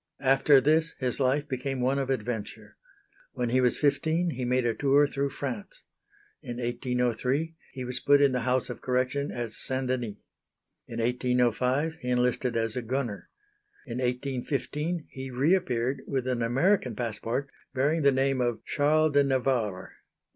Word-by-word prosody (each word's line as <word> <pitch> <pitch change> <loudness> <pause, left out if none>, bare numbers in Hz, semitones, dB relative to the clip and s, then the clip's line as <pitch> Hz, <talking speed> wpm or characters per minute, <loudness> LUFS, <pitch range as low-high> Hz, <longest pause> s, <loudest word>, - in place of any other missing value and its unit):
After 135 +1 +5
this 155 +4 +2
his 125 0 -2
life 140 +2 +1
became 135 -1 -3
one 130 +3 +1
of 135 -1 -2
adventure. 115 -4 -4 0.6
When 125 -1 -1
he 130 +2 +3
was 125 -1 +3
fifteen 160 +4 +1
he 125 -3 -4
made 125 0 +1
a 115 - +2
tour 140 +2 +4
through 140 0 -1
France. 130 -6 -6 0.6
In 120 -1 -6
1803 125 +5 -1 0.2
he 130 -2 -5
was 125 0 -3
put 145 0 +5
in 140 -1 +5
the 125 - 0
House 125 +1 0
of - - -8
Correction 130 +3 0
at 120 -2 -4
St. 130 +4 -2
Denis. 125 -5 -2 0.7
In 115 - -6
1805 125 +5 +1
he 125 - -4
enlisted 125 -1 +1
as 115 -1 +1
a 125 - -1
gunner. 120 -3 -3 0.6
In 125 -2 -5
1815 140 +6 -2
he 130 0 -7
re 135 +7 +2
appeared 130 -8 0
with 130 -2 -1
an 125 -2 0
American 135 - +2
passport 120 +3 -3 0.2
bearing 150 +5 +2
the 140 -1 +5
name 135 0 +1
of 120 -2 -1
Charles 155 +1 +2
de 145 0 +5
Navarre. 125 -8 -1
130 Hz, 160 wpm, -28 LUFS, 125-140 Hz, 0.7 s, After